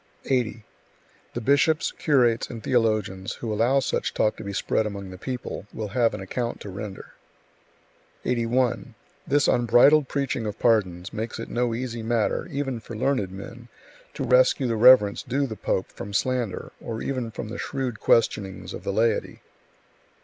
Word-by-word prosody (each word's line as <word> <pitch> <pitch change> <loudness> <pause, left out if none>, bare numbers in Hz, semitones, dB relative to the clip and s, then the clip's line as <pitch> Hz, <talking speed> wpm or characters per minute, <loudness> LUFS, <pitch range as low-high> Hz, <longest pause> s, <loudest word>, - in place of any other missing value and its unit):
80. 120 -4 0 0.7
The 120 - -2
bishops, 145 +6 +3
curates 125 -6 +2
and 115 -2 -8
theologians 110 -6 0
who 115 -2 -4
allow 120 +6 +3
such - - -2
talk 105 - +2
to - - -7
be 100 - -5
spread 110 +2 0
among 100 -2 -6
the 90 - -9
people, 125 -2 -5
will 110 -2 -5
have 115 +2 +2
an - - -7
account 115 +5 -3
to 100 - -7
render. 100 +1 -8 1.1
81. 120 0 0 0.3
This 145 0 +3
unbridled 125 +5 +5
preaching 135 -5 -2
of 105 - -5
pardons 95 -6 +1
makes 110 +2 -4
it 115 - -6
no 120 -1 0
easy 120 -1 -4
matter, 115 -1 0
even 135 -3 -3
for 115 +1 -9
learned 120 -5 0
men, 115 +5 -10 0.5
to - - -3
rescue 130 +2 +4
the 115 -2 0
reverence 110 -3 +6
due 135 +1 -2
to 140 - +1
the 110 - -5
pope 95 - -2
from 100 +1 -8
slander, 125 -5 -1
or 115 -1 -5
even 130 -4 -2
from 110 -1 -6
the - - -6
shrewd 130 -6 -3
questionings 100 -5 +1
of - - -7
the - - -2
laity. 110 +1 0
115 Hz, 165 wpm, -25 LUFS, 105-125 Hz, 1.1 s, reverence